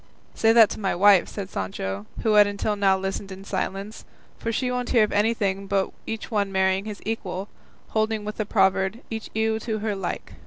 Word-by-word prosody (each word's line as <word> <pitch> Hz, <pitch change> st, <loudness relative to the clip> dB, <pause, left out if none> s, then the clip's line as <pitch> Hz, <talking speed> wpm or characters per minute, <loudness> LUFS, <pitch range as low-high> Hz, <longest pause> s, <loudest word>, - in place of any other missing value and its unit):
"Say 225 Hz, -, +3 dB
that 225 Hz, -2 st, +7 dB
to -, -, -5 dB
my 195 Hz, -2 st, 0 dB
wife," 195 Hz, 0 st, +6 dB
said 195 Hz, -2 st, -6 dB
Sancho, 95 Hz, +1 st, -4 dB, 0.2 s
who 220 Hz, -, +3 dB
had 210 Hz, -1 st, +7 dB
until 205 Hz, +1 st, -1 dB
now 195 Hz, -2 st, +3 dB
listened 195 Hz, +1 st, -4 dB
in 190 Hz, +1 st, -8 dB
silence, 195 Hz, +2 st, -4 dB, 0.4 s
"for 230 Hz, -, -2 dB
she 250 Hz, +3 st, -1 dB
won't 250 Hz, 0 st, -2 dB
hear 230 Hz, -3 st, +5 dB
of 210 Hz, -, 0 dB
anything 205 Hz, -2 st, 0 dB
but 195 Hz, -1 st, 0 dB, 0.2 s
each 225 Hz, +1 st, -5 dB
one 200 Hz, -3 st, 0 dB
marrying 190 Hz, +1 st, +1 dB
his 210 Hz, -2 st, -7 dB
equal, 200 Hz, -3 st, -4 dB, 0.4 s
holding 220 Hz, -1 st, 0 dB
with 210 Hz, -, -5 dB
the 215 Hz, -, -1 dB
proverb 190 Hz, 0 st, +2 dB
'each 220 Hz, -1 st, -5 dB
ewe 220 Hz, 0 st, +1 dB
to 220 Hz, -1 st, -3 dB
her 215 Hz, -1 st, -2 dB
like. 195 Hz, -, -5 dB
205 Hz, 200 wpm, -25 LUFS, 195-220 Hz, 0.4 s, that